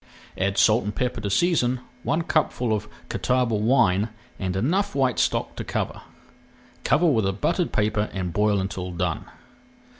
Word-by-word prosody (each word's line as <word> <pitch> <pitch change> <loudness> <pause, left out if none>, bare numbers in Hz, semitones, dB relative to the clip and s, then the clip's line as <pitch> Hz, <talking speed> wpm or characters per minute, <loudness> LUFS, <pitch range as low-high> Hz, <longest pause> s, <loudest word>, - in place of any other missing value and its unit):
Add 100 +1 -1
salt 110 +2 +4
and 105 0 -4
pepper 125 -3 -2
to 100 - -2
season, 130 - +2 0.2
one 160 +6 0
cupful 125 -8 0
of 105 0 -2 0.2
Catawba 125 -2 0
wine, 110 -2 +3 0.3
and 95 -2 -2
enough 185 - 0
white 130 -3 +1
stock - - 0
to - - -3
cover. - - -3 0.8
Cover 155 +4 +3
with 115 - +3
a - - +2
buttered 170 - 0
paper 105 0 0
and 90 -3 -3
boil 105 0 +2
until 95 -1 -3
done. 85 - -2
110 Hz, 155 wpm, -24 LUFS, 100-130 Hz, 0.8 s, salt